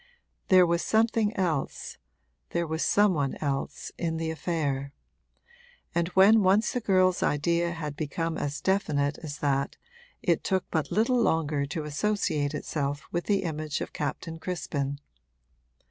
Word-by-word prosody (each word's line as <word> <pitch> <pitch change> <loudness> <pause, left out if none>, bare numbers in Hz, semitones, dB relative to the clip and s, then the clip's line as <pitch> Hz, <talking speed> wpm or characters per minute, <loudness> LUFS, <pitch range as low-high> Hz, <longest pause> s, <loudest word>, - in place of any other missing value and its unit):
There 185 -1 +7
was 170 0 +1
something 220 -1 +2
else, 170 -7 -2 0.5
there 170 0 -1
was 160 0 -2
some 205 -1 +4
one 140 -4 -1
else, 140 -2 -3
in 165 -2 -1
the 160 0 -2
affair; 145 -4 -2 1.0
and 170 0 +1
when 210 +3 +7
once 200 +4 +3
the 250 - -1
girl's 185 -4 +3
idea 170 +3 +1
had 150 -3 -5
become 160 +2 -2
as 145 -2 -3
definite 150 -7 +1
as 150 -2 -6
that 140 -2 0 0.5
it - - +2
took 190 -2 0
but 160 -3 -1
little 240 +3 +2
longer 150 -7 +1
to 155 +2 -4
associate 150 -2 -1
itself 145 -1 -3
with 175 0 -2
the 200 -2 +1
image 155 -2 -3
of - - -5
Captain 160 +2 -4
Crispin. 145 -6 -3
165 Hz, 145 wpm, -28 LUFS, 145-185 Hz, 1.0 s, There